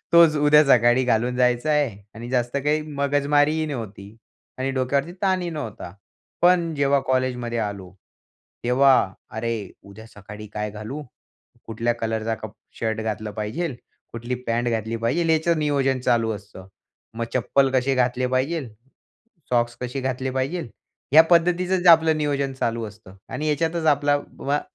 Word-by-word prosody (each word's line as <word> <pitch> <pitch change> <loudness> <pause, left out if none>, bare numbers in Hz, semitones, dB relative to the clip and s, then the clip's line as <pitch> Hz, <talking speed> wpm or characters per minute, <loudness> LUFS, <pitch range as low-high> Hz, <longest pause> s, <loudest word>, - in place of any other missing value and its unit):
तोच 170 -2 +6
उद्या 150 +1 +6
सकाळी 120 -1 +4
घालून 125 +1 +1
जायच 125 +1 +2
आहे 140 -10 0
आणि 120 +2 -8
जास्त 125 0 0
काही 150 +1 +2
मगजमारीही 145 +1 +1
नव्हती 110 -6 -7 0.4
आणि 130 +1 -1
डोक्यावरती 135 +4 -1
ताणही 185 -3 +1
नव्हता. 115 - -6 0.5
पण 175 -2 +3
जेव्हा 140 -1 +2
कॉलेजमध्ये 125 -2 -1
आलो. 100 -4 -4 0.7
तेव्हा 130 +3 +5 0.4
"अरे, 110 -3 -4
उद्या 105 +3 -13
सकाळी 105 +1 -10
काय 105 0 -3
घालू? 110 +8 -7 0.6
कुठल्या 115 +1 -1
कलरचा 115 -1 -2
कप 110 -1 -9 0.3
शर्ट 110 -1 -1
घातला 110 -1 -4
पाहिजे? 110 +8 -4 0.4
कुठली 120 +2 -4
पॅट 120 +1 0
घातली 115 0 -2
पाहिजे?" 140 +9 0
याचं 160 +1 +2
नियोजन 140 -3 +1
चालू 115 -2 +1
असतं. 100 -2 -12 0.5
"मग 115 +1 -2
चप्पल 135 +2 +2
कसे 130 +1 +1
घातले 125 0 +1
पाहिजे? 130 0 -1 0.8
सॉक्स 120 -1 +1
कसे 125 +2 -4
घातले 130 0 -2
पाहिजे?" 135 +4 -2 0.4
ह्या 155 +2 +9
पद्धतीचंच 180 +2 +2
आपलं 160 -1 +6
नियोजन 140 -2 -1
चालू 115 -3 -2
असतं 105 -2 -14
आणि 155 - -4
ह्याच्यातच 160 +2 0
आपला 145 -1 +3 0.2
वा 145 +2 0
130 Hz, 140 wpm, -23 LUFS, 115-150 Hz, 0.8 s, ह्या